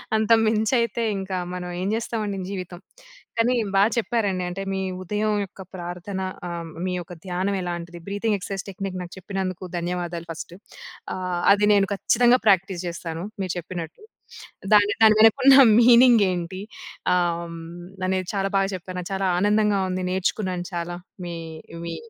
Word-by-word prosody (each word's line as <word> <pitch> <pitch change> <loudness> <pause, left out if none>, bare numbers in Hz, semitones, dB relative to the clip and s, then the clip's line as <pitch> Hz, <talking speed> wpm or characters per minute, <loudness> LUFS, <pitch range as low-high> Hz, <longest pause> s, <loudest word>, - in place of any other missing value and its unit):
అంతకు 225 +1 +4
మించైతే 230 +1 +1
ఇంకా 190 -1 -3 0.2
మనం 180 -1 -5
ఏం 190 - -1
జేస్తామండి 220 -3 -2
జీవితం. 180 -3 -6 0.6
కానీ 240 +2 +3 0.2
బా 195 - +6
చెప్పారండి. 210 -6 0
అంటే 185 +2 -5
మీ 190 - -1 0.2
ఉదయం 210 +3 -1
యొక్క 195 - -14
ప్రార్థన 180 +2 -5 0.3
ఆహ్, 170 -1 -5 0.2
మీ 185 - -1
యొక్క 175 0 -8
ధ్యానం 185 +2 -1
ఎలాంటిది? 175 -1 -5
బ్రీతింగ్ 205 +1 0
ఎక్సర్సైజ్ 195 0 -5
టెక్నిక్ 190 -1 -5
నాకు 175 - -10
చెప్పినందుకు 190 -1 -4
ధన్యవాదాలు 175 -1 -3
ఫస్ట్. 165 +1 -8 0.6
ఆహ్, 180 -1 -2
అది 205 0 +2
నేను 195 -1 +3
ఖచ్చితంగా 245 +5 +3
ప్రాక్టీస్ 190 -2 +3
జేస్తాను. 170 -1 -5 0.2
మీరు 185 -3 -2
చెప్పినట్టు. 170 - -7 0.7
దాని 205 -1 +5
దాని 215 -1 +7
వెనక 220 0 +7
ఉన్న 275 0 +9 0.2
మీనింగ్ 240 -1 +7
ఏంటి 180 +1 -4 0.5
ఆహ్, 170 -1 -1 0.5
అనేది 185 -1 -1
చాలా 195 0 0
బాగా 195 0 +2
చెప్పాను. 185 0 -7
నాకు 180 +2 -6
చాలా 195 0 0
ఆనందంగా 205 0 +2
ఉంది. 185 0 -2
నేర్చుకున్నాను 185 -1 -1
చాలా. 175 0 -3 0.3
మీ 170 -1 -5 0.5
మీ 170 -1 -4
190 Hz, 145 wpm, -24 LUFS, 175-210 Hz, 0.7 s, ఉన్న